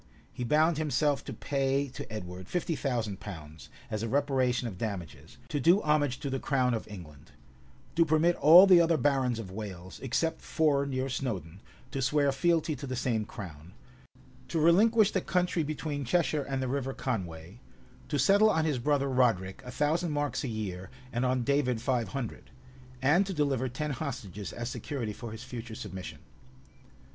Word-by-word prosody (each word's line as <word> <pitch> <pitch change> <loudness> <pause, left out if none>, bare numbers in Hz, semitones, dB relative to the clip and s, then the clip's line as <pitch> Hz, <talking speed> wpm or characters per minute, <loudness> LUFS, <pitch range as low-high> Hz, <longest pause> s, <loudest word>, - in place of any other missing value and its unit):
[] - - -31
He 125 - -4
bound 155 +5 +3
himself 150 -2 +1
to - - -6
pay 135 0 0
to 125 - -8
Edward 90 -3 -7
fifty 170 - -1
thousand 115 -9 -2
pounds, 80 -7 -9 0.2
as 110 - -2
a 115 - -2
reparation 130 -2 +1
of 95 -5 -8
damages; 105 +2 -6
to 145 - -1
do 170 +8 +5
homage 145 -4 +1
to 140 - -3
the 135 - -1
crown 130 -3 +1
of 115 - -3
England; 85 -9 -12 0.6
to 165 - +5
permit 165 +2 +3
all 170 +5 +9
the 185 -3 +7
other 165 -1 +3
barons 130 -3 +1
of 105 -5 -6
Wales, 95 -3 -7
except 160 +5 -1
four 140 -3 +1
near 130 -1 -1
Snowdun, 100 - -4 0.3
to 135 - -3
swear 140 +2 +2
fealty 160 +2 +1
to 140 - -7
the 130 - -3
same 120 -4 0
crown; 85 -4 -9 0.7
to 165 - -1
relinquish 210 +7 +5
the 190 - 0
country 180 -2 0
between 150 -1 -3
Cheshire 155 +2 +1
and 135 -1 -1
the - - -1
River 135 0 -2
Conway; 95 -6 -4 0.5
to 145 - -1
settle 200 - +5
on 160 -5 +2
his 145 -5 0
brother 140 +2 +1
Roderic 115 -8 +1
a 125 - -9
thousand 155 +6 0
marks 145 -1 -1
a - - -2
year, 100 -5 -5 0.2
and 120 +1 0
on 125 -1 +1
David 135 -3 +1
five 125 -1 0
hundred; 130 -5 -6 0.5
and 155 +8 +5
to 190 - -4
deliver 135 -4 0
ten 150 +5 -3
hostages 115 - -5
as 120 0 -5
security 125 -4 -4
for 115 +1 -8
his 110 +2 -8
future 120 -3 -7
submission. 95 -3 -7
130 Hz, 175 wpm, -29 LUFS, 110-150 Hz, 0.7 s, all